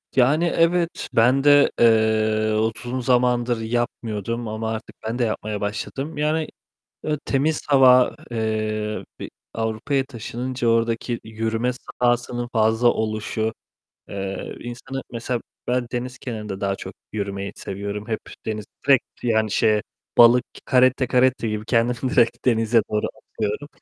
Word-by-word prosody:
Yani 145 +7 +4
evet, 170 0 +1
ben 125 +3 +4
de, 145 0 +6
eee, 110 -1 +3
uzun 120 +3 -2
zamandır 120 -1 +2
yapmıyordum 115 -1 -2
ama 110 +1 -3
artık 110 - -6
ben 115 +3 -3
de 120 - +3
yapmaya 110 -2 -2
başladım. 135 +9 -4
Yani, 155 +1 0 0.6
eee, 150 -1 0
temiz 145 +3 +1
hava, 130 -3 +6
eee, 110 -1 -2 0.2
bir - - -6 0.2
Avrupa'ya 115 +5 -1
taşınınca 125 0 -4
oradaki 115 +1 +1
yürüme 110 +2 -1 0.3
sahasının 120 0 +1
fazla 110 +1 +3
oluşu, 110 0 -1 0.6
eee, 100 -1 -5
insanı 125 +3 -6
mesela 120 0 -3 0.3
ben 125 0 0
deniz 125 +1 -4
kenarında 105 -6 -6
daha 100 -1 0
çok - - -8 0.2
yürümeyi 100 -1 -3
seviyorum. 100 +2 -5
Hep 110 -2 -2 0.3
deniz, 105 -1 -3 0.2
direkt 135 -3 +6 0.2
yani 110 -3 +1
şeye 105 +1 +3 0.4
balık, 120 +1 +7 0.3
caretta 130 0 +4
caretta 125 -2 +2
gibi 105 0 -3
kendimi 120 +2 +1
direkt 120 0 +2
denize 115 -1 +3
doğru 105 - 0 0.3
atıyorum. 105 +7 -2
115 Hz, 130 wpm, -23 LUFS, 110-125 Hz, 0.6 s, balık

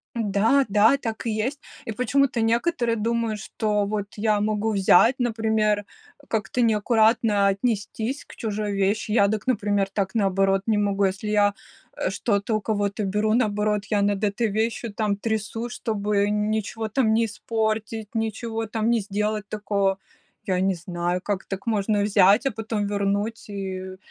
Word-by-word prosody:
Да, 225 +5 +2
да, 215 +6 +5
так 230 -4 -5
и - - +1
есть. 235 +7 -2 0.2
И 225 - -4
почему-то 250 +2 +1
некоторые 235 +2 +1
думают, 230 0 -1
что 210 0 -1
вот 205 0 -2
я 210 -1 +1
могу 215 +1 0
взять, 200 +5 +5
например, 220 -3 +1 0.4
как-то 220 +3 -1
неаккуратно 220 -2 +3
отнестись 220 +5 -2
к - - -14
чужой 210 -2 -3
вещи. 200 +2 0
Я 200 -3 +4
дак, 215 +3 -2
например, 205 -5 +1
так, 195 -2 -2
наоборот, 195 -2 +2
не 220 -2 +2
могу. 200 -1 +1
Если 195 +2 -1
я, 205 -1 +3 0.4
э, - - -1
что-то 205 +2 -1
у - - -1
кого-то 205 -1 -1
беру, 210 +2 +1
наоборот, 210 -3 +1
я 205 -1 +2
над 205 0 +1
этой 210 +3 0
вещью 220 +2 -2
там 205 -1 0
трясусь, 220 +2 -3
чтобы 205 -2 0
н 210 +1 0
ничего 220 +1 -2
там 220 0 +2
не 230 +1 +3
испортить, 220 0 -2
ничего 225 0 -2
там 220 +1 -1
не 235 -1 +3
сделать 210 +1 -2
такого. 200 -2 0 0.5
Я 185 -2 +1
не 190 0 +2
знаю, 175 +1 -3
как 195 0 -3
так 195 0 -6
можно 210 -1 +1
взять, 205 +3 +4
а - - +3
потом 220 -2 -3
вернуть 205 +2 -2
и 190 -1 -5
210 Hz, 160 wpm, -24 LUFS, 200-225 Hz, 0.5 s, да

